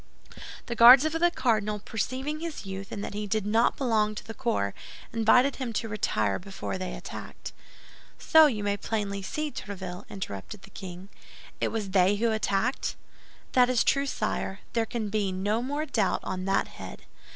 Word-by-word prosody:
The 235 Hz, -, -3 dB
Guards 245 Hz, +4 st, +9 dB
of 315 Hz, -, +1 dB
the 330 Hz, +2 st, +3 dB
cardinal, 220 Hz, -9 st, 0 dB
perceiving 255 Hz, +8 st, -3 dB
his 330 Hz, -8 st, -6 dB
youth 195 Hz, 0 st, -6 dB
and 205 Hz, -, -4 dB
that -, -, -5 dB
he 210 Hz, 0 st, -3 dB
did 215 Hz, 0 st, 0 dB
not 225 Hz, +3 st, +2 dB
belong 220 Hz, -5 st, +1 dB
to -, -, -7 dB
the 225 Hz, -, -7 dB
corps, 210 Hz, -, -1 dB, 0.4 s
invited 245 Hz, +4 st, +4 dB
him 255 Hz, -4 st, -4 dB
to 225 Hz, +2 st, -2 dB
retire 110 Hz, -, 0 dB
before 190 Hz, 0 st, -5 dB
they 185 Hz, -1 st, -4 dB
attacked." -, -, -8 dB, 0.6 s
"So 320 Hz, -1 st, +6 dB
you 215 Hz, -7 st, -2 dB
may 205 Hz, 0 st, 0 dB
plainly 200 Hz, -1 st, -2 dB
see, 305 Hz, +9 st, -3 dB
Tréville," 185 Hz, -6 st, -7 dB
interrupted 190 Hz, -, -7 dB
the 195 Hz, -, -14 dB
king, 185 Hz, 0 st, -9 dB, 0.5 s
"it -, -, +1 dB
was 215 Hz, -4 st, -3 dB
they 190 Hz, +1 st, +4 dB
who 225 Hz, +2 st, +1 dB
attacked?" 220 Hz, +3 st, 0 dB, 0.6 s
"That 250 Hz, -1 st, +5 dB
is 250 Hz, -2 st, +3 dB
true, 275 Hz, 0 st, +2 dB
sire; 195 Hz, -6 st, -2 dB
there 230 Hz, -1 st, +1 dB
can 220 Hz, -2 st, -3 dB
be 200 Hz, -2 st, 0 dB
no 205 Hz, +5 st, 0 dB
more 290 Hz, +4 st, -2 dB
doubt 215 Hz, -10 st, 0 dB
on 185 Hz, 0 st, -4 dB
that 195 Hz, 0 st, +1 dB
head. -, -, -10 dB
215 Hz, 175 wpm, -28 LUFS, 195-250 Hz, 0.6 s, Guards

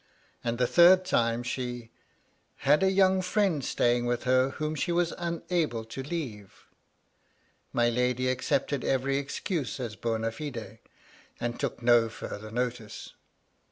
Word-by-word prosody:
And 115 Hz, 0 st, -1 dB
the 125 Hz, -, +2 dB
third 180 Hz, +6 st, +6 dB
time, 115 Hz, -7 st, +1 dB
she 120 Hz, -2 st, -4 dB, 0.3 s
" -, -, -41 dB
had 150 Hz, +4 st, +5 dB
a 190 Hz, -, +4 dB
young 190 Hz, -1 st, +4 dB
friend 180 Hz, -5 st, +1 dB
staying 120 Hz, 0 st, +1 dB
with 120 Hz, 0 st, -1 dB
her 130 Hz, +1 st, +3 dB
whom 155 Hz, +2 st, -3 dB
she 155 Hz, +4 st, -1 dB
was 170 Hz, 0 st, +1 dB
unable 170 Hz, -8 st, -2 dB
to 115 Hz, +4 st, -6 dB
leava" 130 Hz, -, -5 dB, 1.2 s
My 120 Hz, 0 st, +2 dB
lady 125 Hz, +1 st, +1 dB
accepted 130 Hz, +1 st, 0 dB
every 135 Hz, +1 st, +1 dB
excuse 140 Hz, -, -3 dB
as 115 Hz, -4 st, -4 dB
bona 115 Hz, +1 st, -1 dB
fide, 115 Hz, -6 st, -7 dB, 0.6 s
and 120 Hz, 0 st, -3 dB
took -, -, -3 dB
no 120 Hz, -1 st, +5 dB
farther 110 Hz, -1 st, -7 dB
notice. 120 Hz, -1 st, -4 dB
125 Hz, 140 wpm, -28 LUFS, 120-155 Hz, 1.2 s, third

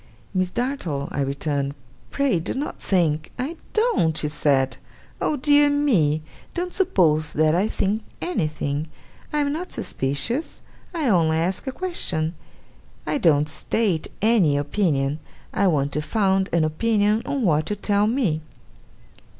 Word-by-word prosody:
'Miss 185 Hz, -1 st, +1 dB
Dartle,' 185 Hz, -, -2 dB
I -, -, -2 dB
returned, 140 Hz, 0 st, -1 dB, 0.3 s
'pray 275 Hz, -11 st, +1 dB
do 165 Hz, -, -3 dB
not 285 Hz, +3 st, -4 dB
think 160 Hz, -5 st, +1 dB
' -, -, -31 dB
'I 270 Hz, +7 st, -3 dB, 0.2 s
don't!' 430 Hz, -, +2 dB
she 150 Hz, -, 0 dB
said. 140 Hz, -3 st, +1 dB, 0.4 s
'Oh 305 Hz, -, +1 dB
dear 290 Hz, +1 st, +5 dB
me, 190 Hz, -, +2 dB, 0.3 s
don't 360 Hz, 0 st, -3 dB
suppose 160 Hz, -, +2 dB
that 155 Hz, 0 st, +3 dB
I 185 Hz, +5 st, +2 dB
think 215 Hz, 0 st, -1 dB, 0.2 s
anything! 155 Hz, -, -2 dB, 0.4 s
I 300 Hz, -, -1 dB
am 285 Hz, 0 st, 0 dB
not 355 Hz, +4 st, -5 dB
suspicious. 145 Hz, -, -2 dB, 0.3 s
I 325 Hz, -6 st, -1 dB
only 165 Hz, -7 st, +3 dB
ask 180 Hz, +9 st, -1 dB
a -, -, 0 dB
question. 180 Hz, -, -1 dB, 0.7 s
I 290 Hz, -, 0 dB
don't 150 Hz, -, +4 dB
state 165 Hz, +2 st, -1 dB, 0.2 s
any 200 Hz, -11 st, +4 dB
opinion. 145 Hz, -2 st, 0 dB, 0.3 s
I 200 Hz, -, +2 dB
want 145 Hz, -5 st, +1 dB
to 150 Hz, -, -1 dB
found 190 Hz, +2 st, +1 dB
an 170 Hz, -1 st, +2 dB
opinion 210 Hz, +6 st, +2 dB
on 275 Hz, -3 st, -1 dB
what 155 Hz, -5 st, +2 dB
you 210 Hz, -, 0 dB
tell 205 Hz, 0 st, +1 dB
me. 215 Hz, -, 0 dB
180 Hz, 145 wpm, -23 LUFS, 150-245 Hz, 0.7 s, dear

